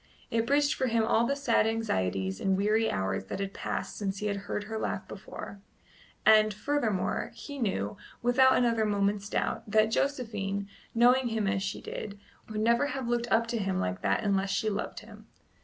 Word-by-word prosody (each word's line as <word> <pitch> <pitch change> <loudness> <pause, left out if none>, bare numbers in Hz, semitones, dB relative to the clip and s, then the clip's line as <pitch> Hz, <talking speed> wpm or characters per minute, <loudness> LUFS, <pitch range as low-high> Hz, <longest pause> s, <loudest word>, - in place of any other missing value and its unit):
It 230 0 +1
bridged 285 +2 +3
for 260 - -1
him 230 -1 +2
all 225 +1 +3
the 280 - +1
sad 240 -6 +2
anxieties 95 - -1
and 190 -1 +2
weary 215 +3 +2
hours 95 0 -1
that 95 - -5
had 195 0 -3
passed - - -4
since 195 -2 -2
he 210 - -4
had 205 -1 0
heard 210 - -2
her 220 +1 -4
laugh - - -3
before; 200 - -9 0.6
and, 215 0 +6
furthermore, 220 -5 -1
he 285 -1 -8
knew, 105 - -1 0.3
without 260 +2 +5
another 230 -3 +2
moment's 200 -1 0
doubt, - - -1
that 215 +1 +3
Josephine, 210 -8 -1 0.3
knowing 245 +2 +5
him 225 -2 -1
as 195 -1 0
she 195 0 -3
did, 205 -1 -6 0.3
would 215 -1 -3
never 235 +5 +3
have 270 -3 -4
looked 240 0 -1
up 230 +1 +4
to 235 -1 -1
him 190 -2 -1
like 90 0 -2
that 100 -1 +1
unless 195 -1 +1
she 215 +2 0
loved 205 - -4
him. 215 0 -14
215 Hz, 190 wpm, -29 LUFS, 195-235 Hz, 0.6 s, and